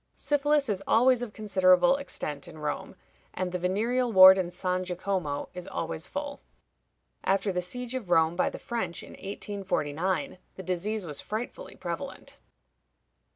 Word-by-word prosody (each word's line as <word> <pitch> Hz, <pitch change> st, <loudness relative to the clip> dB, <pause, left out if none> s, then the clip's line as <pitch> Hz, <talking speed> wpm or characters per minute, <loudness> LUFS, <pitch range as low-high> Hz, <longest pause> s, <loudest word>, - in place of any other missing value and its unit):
Syphilis 290 Hz, 0 st, +2 dB
is 195 Hz, -3 st, -1 dB
always 245 Hz, +2 st, +4 dB
of 245 Hz, -3 st, -4 dB
considerable 200 Hz, +4 st, +4 dB
extent 150 Hz, -, -4 dB
in -, -, -11 dB
Rome, 150 Hz, -1 st, -4 dB, 0.4 s
and 185 Hz, -1 st, -2 dB
the 180 Hz, -, -2 dB
venereal 230 Hz, +7 st, 0 dB
ward 190 Hz, -1 st, +10 dB
in 180 Hz, -2 st, -1 dB
San 180 Hz, +1 st, -2 dB
Jacomo 180 Hz, -5 st, -2 dB
is 180 Hz, -1 st, -7 dB
always 165 Hz, +1 st, -4 dB
full. 285 Hz, 0 st, -5 dB, 0.8 s
After 195 Hz, +1 st, +1 dB
the 180 Hz, -1 st, -1 dB
siege 245 Hz, +7 st, -4 dB
of 245 Hz, -8 st, -4 dB
Rome 165 Hz, -1 st, +4 dB
by 180 Hz, -, +2 dB
the -, -, -8 dB
French 205 Hz, -8 st, -4 dB
in -, -, -11 dB
1849, 190 Hz, -, -3 dB, 0.2 s
the 190 Hz, -, -8 dB
disease 190 Hz, +3 st, -2 dB
was 150 Hz, -4 st, -3 dB
frightfully 240 Hz, -, -6 dB
prevalent. -, -, -6 dB
190 Hz, 150 wpm, -28 LUFS, 180-235 Hz, 0.8 s, ward